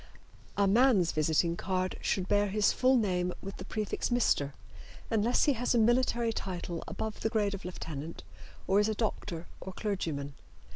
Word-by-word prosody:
A 200 - +4
man's 205 -4 +4
visiting 160 +2 +1
card 185 0 -1
should 185 -2 0
bear 205 +1 +3
his 205 +1 +2
full 255 +1 +4
name 180 -5 0
with 195 0 -6
the - - -8
prefix 215 -2 -2
"Mr." 180 - +2 0.6
unless 225 +2 +3
he 290 - +4
has 245 0 0
a - - +4
military 235 0 +2
title 175 -4 -4
above 220 -1 -4
the 220 - 0
grade 210 -2 +1
of 195 - -6
lieutenant 165 -3 -6 0.4
or 195 +2 +3
is 210 +1 +2
a 215 - -1
doctor 185 -6 -3 0.2
or 190 - -7
clergyman. 160 -10 -3
200 Hz, 165 wpm, -30 LUFS, 180-220 Hz, 0.6 s, A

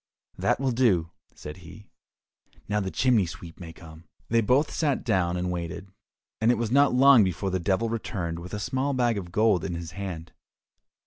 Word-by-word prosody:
"That - - 0
will 135 -1 0
do," 100 -10 +2 0.2
said 75 +3 -9
he; 90 +3 -14 0.8
"now 105 +1 0
the 95 -2 -2
chimney 115 -4 +2
sweep 85 0 -10
may 85 -3 -8
come." 80 0 -14 0.2
They 115 0 +3
both 130 +8 +2
sat 145 -5 0
down 90 -5 0
and 90 0 -2
waited, 90 +2 -5 0.5
and 110 - +3
it 120 - +3
was 115 -1 -2
not 140 +2 +4
long 135 -3 +7
before 95 +1 -2
the 95 - 0
Devil 95 +6 0
returned 95 -7 -4
with 90 +4 -7
a - - -4
small 130 +5 -1
bag 120 -4 +1
of 85 -3 -9
gold 105 -2 +2
in 85 - -3
his 85 -1 -6
hand. 90 -4 -7
95 Hz, 190 wpm, -26 LUFS, 85-115 Hz, 0.8 s, long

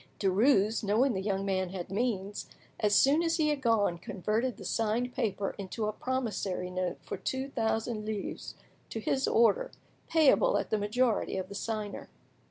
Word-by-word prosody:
Derues, 210 +2 +3
knowing 230 +6 +3
the 190 - -2
young 195 -1 -1
man 190 -2 0
had 180 -1 -6
means, 205 -2 -2 0.3
as 210 -1 +3
soon 285 +8 +5
as 330 -1 +1
he 310 -2 +2
had 295 -2 -1
gone, 210 -8 +2
converted 215 +8 -2
the - - -9
signed 230 +3 0
paper 205 -6 -1
into 200 +3 -3
a 210 - -1
promissory 205 -8 -2
note 180 -1 -2
for - - -5
two 265 +1 -3
thousand 225 -2 -1
livres, 215 -2 -5 0.3
to 225 - -4
his 265 +4 0
order, 485 - +3 0.4
payable 325 - +4
at - - -3
the 215 - +2
majority 215 0 +1
of 185 0 -4
the - - -7
signer. 210 0 -4
215 Hz, 170 wpm, -30 LUFS, 195-250 Hz, 0.4 s, soon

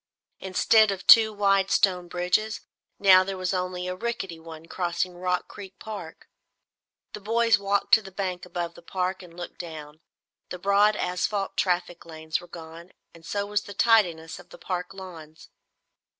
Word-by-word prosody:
Instead 210 +3 +3
of 195 -2 -4
two 225 -2 +8
wide 195 -2 +2
stone 180 -2 +2
bridges, 180 +5 -1 0.4
now 185 -2 +6
there 195 0 -5
was 185 0 -2
only 180 -1 -3
a 180 - -2
rickety 195 -5 -4
one 160 0 -11
crossing 175 +1 -2
Rock 180 0 -2
Creek 195 -2 -11
Park. 200 -7 -9 0.9
The - - -6
boys 230 +2 +2
walked 200 0 -1
to 220 - +8
the 195 -2 -11
bank 185 -2 -4
above 175 -1 -5
the 170 - -15
park 185 +2 -3
and 175 -2 -14
looked 175 - -8
down. 155 -3 -9 0.5
The 180 - -6
broad 200 +3 +3
asphalt 195 +2 -2
traffic 175 -2 -1
lanes 160 -1 -4
were 175 - -14
gone, 170 +1 -11 0.2
and 165 - -17
so 200 +4 -3
was 205 0 -1
the 205 - -11
tidiness 175 -9 +2
of - - -16
the - - -13
park 180 -1 -4
lawns. 165 -5 -11
185 Hz, 165 wpm, -26 LUFS, 175-200 Hz, 0.9 s, two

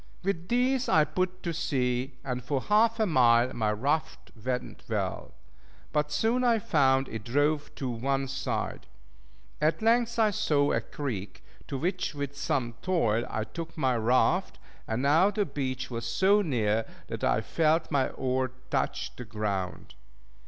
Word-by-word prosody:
With 175 -3 -2
these 250 +2 +1
I 155 - +5
put 185 +4 -2
to 170 - -2
sea, 130 -5 -1
and 125 -2 -3
for 135 +2 -1
half 220 - +3
a 220 - +3
mile 125 - +4
my 110 -2 0
raft 105 - -2
went 125 0 -3
well; - - -3 0.6
but 150 -1 +1
soon 225 +11 +1
I 235 -2 +4
found 135 -8 +2
it 110 -2 -6
drove 145 +5 +1
to 135 - -4
one 135 +3 -1
side. 135 +1 -3 0.7
At 155 +8 +1
length 235 +1 +3
I 220 -2 +4
saw 145 -6 +2
a - - +1
creek, 115 -9 -5 0.2
to 135 - -3
which, 180 +2 -2
with 140 -1 -4
some 125 -4 -1
toil, 120 -11 +1
I 110 - -2
took 165 +9 -7
my 130 -4 +2
raft; 120 +3 +2 0.3
and 115 +4 -1
now 160 +8 +5
the 205 0 0
beach 130 -4 -4
was 115 -1 -3
so 200 +3 +4
near, 115 - 0 0.2
that - - -6
I - - +2
felt 160 0 +1
my 140 -3 +2
oar 130 -1 -1 0.2
touch 130 -1 -1
the 125 - -6
ground. 100 -5 -3
140 Hz, 160 wpm, -28 LUFS, 125-170 Hz, 0.7 s, I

